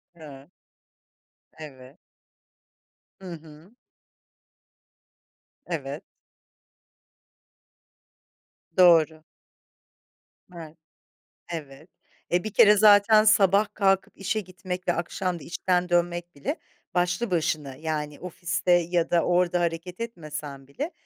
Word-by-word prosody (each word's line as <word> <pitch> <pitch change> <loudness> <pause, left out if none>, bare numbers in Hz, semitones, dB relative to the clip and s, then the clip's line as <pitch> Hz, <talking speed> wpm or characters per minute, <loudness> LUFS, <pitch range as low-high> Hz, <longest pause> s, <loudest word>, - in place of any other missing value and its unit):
Evet. 145 -3 -13 1.1
Evet. 135 -2 -12 1.2
Hı 185 - -8
hı. 160 +5 -14 1.9
Evet. 145 -5 -5 2.7
Doğru. 160 -3 +5 1.3
Evet. 160 -2 -10 0.7
Evet. 155 0 -8 0.4
E, 175 +1 +1
bir 215 -1 -6
kere 210 0 +6
zaten 215 +1 +6
sabah 205 -1 +4
kalkıp 195 -2 +1
işe 195 +3 -2
gitmek 185 -1 -7
ve 175 - +3
akşam 175 +1 -3
da - - -12
işten 180 +1 -1
dönmek 175 0 -1
bile 140 - -3 0.4
başlı 180 +5 0
başına 155 -5 -1
Yani 150 -1 -4
ofiste 180 +1 -3
ya 175 -1 +2
da 170 -1 +2
orada 180 0 +1
hareket 170 +1 -3
etmesen 155 - -7
bile 285 - -5
175 Hz, 90 wpm, -25 LUFS, 155-185 Hz, 2.7 s, kere